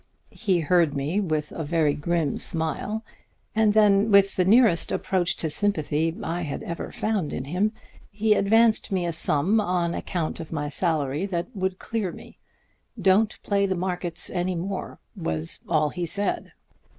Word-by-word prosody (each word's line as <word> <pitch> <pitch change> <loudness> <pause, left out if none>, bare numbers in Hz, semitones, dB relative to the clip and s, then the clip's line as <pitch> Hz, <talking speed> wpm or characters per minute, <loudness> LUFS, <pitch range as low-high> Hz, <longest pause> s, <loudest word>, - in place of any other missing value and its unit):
He 190 -6 0
heard 165 -1 +2
me 145 +8 -1
with 155 -6 -2
a 165 - -5
very 155 -1 +1
grim 160 -1 -1
smile, 175 +7 0 0.5
and 215 -1 +2
then, 210 0 +4
with 200 -1 +4
the 185 - +2
nearest 215 -2 +4
approach 180 -3 0
to 160 - -2
sympathy 160 -4 +1
I 170 +2 -3
had 150 -4 -5
ever 170 - -6
found 210 -8 -2
in 130 - -4
him, 185 +9 0 0.4
he 215 +1 +2
advanced 220 +3 +3
me 185 -2 0
a 170 - -2
sum 165 +7 +2
on 175 -3 -1
account 170 -3 -3
of 160 - -8
my 145 -2 -3
salary 155 +1 -1
that 175 -1 -4
would 190 -1 -2
clear 215 -5 -3
me. - - -14 0.6
'Don't 200 +3 +2
play 200 -1 +1
the 190 - -1
markets 180 -1 +2
any 180 0 -2
more,' 185 +3 -5 0.2
was 80 0 -1
all 155 -2 +2
he 175 +2 -4
said. 200 +4 -2
180 Hz, 160 wpm, -24 LUFS, 160-200 Hz, 0.6 s, then